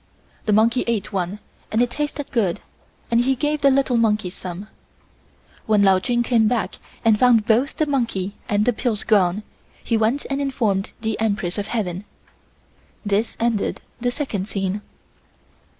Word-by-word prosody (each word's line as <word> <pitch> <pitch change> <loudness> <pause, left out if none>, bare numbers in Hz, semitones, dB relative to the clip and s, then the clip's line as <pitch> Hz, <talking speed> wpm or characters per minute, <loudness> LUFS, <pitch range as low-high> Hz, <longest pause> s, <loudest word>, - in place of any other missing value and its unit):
The - - +3
monkey 230 +4 +3
ate 210 -2 -1
one 185 +1 -2 0.3
and 220 - +1
it 245 0 +2
tasted 295 0 -4
good 200 -8 +1 0.5
and 235 0 +4
he 265 +2 +2
gave 295 +3 -1
the 280 - +6
little 270 -2 +2
monkeys 215 -5 +1
some. 185 +3 -7 1.0
When 210 -2 +4
Lao 190 -1 +5
Chun 240 +4 0
came 230 -2 +3
back 235 0 -1 0.3
and 220 -2 +5
found 240 -4 +5
both 240 +7 +2
the 310 - +2
monkey 230 -9 -1 0.2
and 205 0 +2
the 245 - +3
pills 220 -2 -1
gone 200 -2 +2 0.4
he 230 - +1
went 225 +6 +1
and 275 +1 0
informed 220 -8 0
the 220 -1 -2
Empress 205 -4 -1
of 200 - -3
Heaven. 195 -4 -3 1.0
This 205 +3 0
ended 230 -3 0 0.2
the 245 0 0
second 235 -8 -3
scene. 195 -1 -2
220 Hz, 160 wpm, -22 LUFS, 200-245 Hz, 1.0 s, the